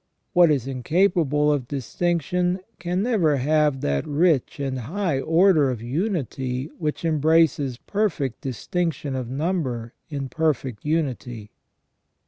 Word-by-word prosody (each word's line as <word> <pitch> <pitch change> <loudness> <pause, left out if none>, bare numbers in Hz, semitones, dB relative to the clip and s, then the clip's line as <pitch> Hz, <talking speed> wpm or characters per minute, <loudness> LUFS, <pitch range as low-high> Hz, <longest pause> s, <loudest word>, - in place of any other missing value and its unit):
What 175 -2 +6
is 140 -5 +1
incapable 150 +2 +2
of 135 -4 -2
distinction 175 - -1 0.2
can 180 +3 -1
never 185 - +2
have 150 0 +2
that 70 -1 -1
rich 150 -2 +1
and 135 -2 -2
high 160 - -1
order 165 -1 +4
of 125 -3 -3
unity 135 - -2
which 155 0 -2
embraces 155 -4 +2
perfect 165 - -2
distinction 145 +2 -2
of 125 -3 -4
number 130 -6 -2 0.2
in 140 -3 -4
perfect 135 -6 -1
unity. 130 -8 -2
150 Hz, 115 wpm, -24 LUFS, 130-170 Hz, 0.2 s, What